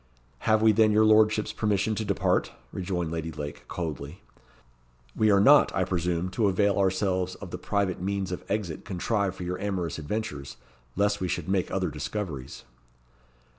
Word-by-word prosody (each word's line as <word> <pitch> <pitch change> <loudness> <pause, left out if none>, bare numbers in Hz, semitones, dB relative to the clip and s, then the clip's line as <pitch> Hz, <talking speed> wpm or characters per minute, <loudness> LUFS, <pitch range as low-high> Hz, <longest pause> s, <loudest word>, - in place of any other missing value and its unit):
"Have 110 0 +4
we 110 - +7
then 110 0 +4
your 110 +1 +4
lordship's 110 0 +4
permission 105 0 0
to 110 - -2
depart?" 100 -2 +1 0.2
rejoined 90 -3 -3
Lady 80 -1 -3
Lake, 75 -1 -7
coldly. 80 -1 -5 0.9
"We 110 - +3
are 100 -1 +5
not, 140 +8 +6
I 95 - +2
presume, 90 -1 -1
to 105 +3 +1
avail 100 +1 +2
ourselves 95 -1 0
of - - -10
the - - -5
private 100 -4 -1
means 95 -1 -2
of 90 - -5
exit 100 -6 -2
contrived 100 +1 -1
for - - -7
your 90 +1 -3
amorous 90 -6 -2
adventures, 75 - -4 0.4
lest 100 +1 +1
we 90 - 0
should - - -3
make 95 -2 0
other 95 -4 -1
discoveries." 75 -3 -5
95 Hz, 165 wpm, -27 LUFS, 85-105 Hz, 0.9 s, we